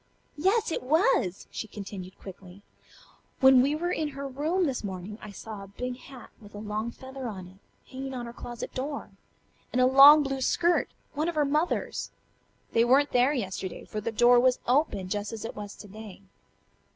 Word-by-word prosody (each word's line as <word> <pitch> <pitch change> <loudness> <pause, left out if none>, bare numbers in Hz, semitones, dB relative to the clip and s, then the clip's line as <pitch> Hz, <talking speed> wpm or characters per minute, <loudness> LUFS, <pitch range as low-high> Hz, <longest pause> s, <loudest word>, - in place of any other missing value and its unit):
Yes, 400 +5 +2
it - - -2
was!" 300 - +2
she 220 - -5
continued 195 -3 -8
quickly. 190 0 -12 0.8
"When 265 -2 +7
we 280 +3 +2
were 350 +3 -2
in 315 -3 -1
her 280 0 -4
room 310 +8 0
this 265 -6 -2
morning 195 +2 -6
I 215 - -9
saw 210 +1 -8
a - - -11
big 250 +6 -5
hat 260 -2 -13
with 205 -1 -14
a - - -6
long 215 +2 -3
feather 260 +1 -8
on 190 -5 -7
it, 190 +2 -18 0.3
hanging 265 0 -5
on 245 -1 -4
her 235 - -8
closet 240 0 -7
door, 280 +3 -4 0.6
and 250 - 0
a 255 - +6
long 280 +3 +9
blue 270 -1 -3
skirt, 345 +6 +2 0.2
one 310 +3 -1
of 340 - -5
her 300 -1 +2
mother's. 300 +5 -1 0.6
They 230 - +4
weren't 270 +4 +4
there 250 +3 +3
yesterday, 190 -7 -4
for 215 - -5
the 230 - -2
door 240 +2 +5
was 255 0 +3
open, 245 -8 +1
just 205 +2 -3
as 225 0 -6
it - - -6
was 205 -1 -7
to 205 - -12
day." 205 -1 -11
250 Hz, 190 wpm, -28 LUFS, 205-280 Hz, 0.8 s, long